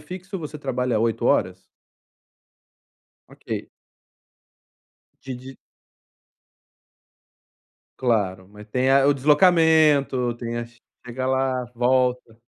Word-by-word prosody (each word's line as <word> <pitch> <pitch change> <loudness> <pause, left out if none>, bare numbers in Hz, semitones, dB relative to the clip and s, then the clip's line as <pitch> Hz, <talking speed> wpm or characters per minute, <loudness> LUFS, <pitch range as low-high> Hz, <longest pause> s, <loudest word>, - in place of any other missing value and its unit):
fixo, 185 +5 -8
você 150 -2 -7
trabalha 125 -4 -1
8 115 0 -1
horas? - - +1 1.7
Ok. - - -7 1.6
De, 135 - -5
de 130 +2 -11 2.4
claro, 100 -7 -1
mas 105 +1 -14
tem 130 +4 0
a 135 0 +4
o 145 - +4
deslocamento, 150 -4 +3
tem 120 0 -5
a 120 - -5
chega 120 +2 -9
lá, 130 -1 0
volta. 125 -1 0
130 Hz, 90 wpm, -23 LUFS, 120-145 Hz, 2.4 s, a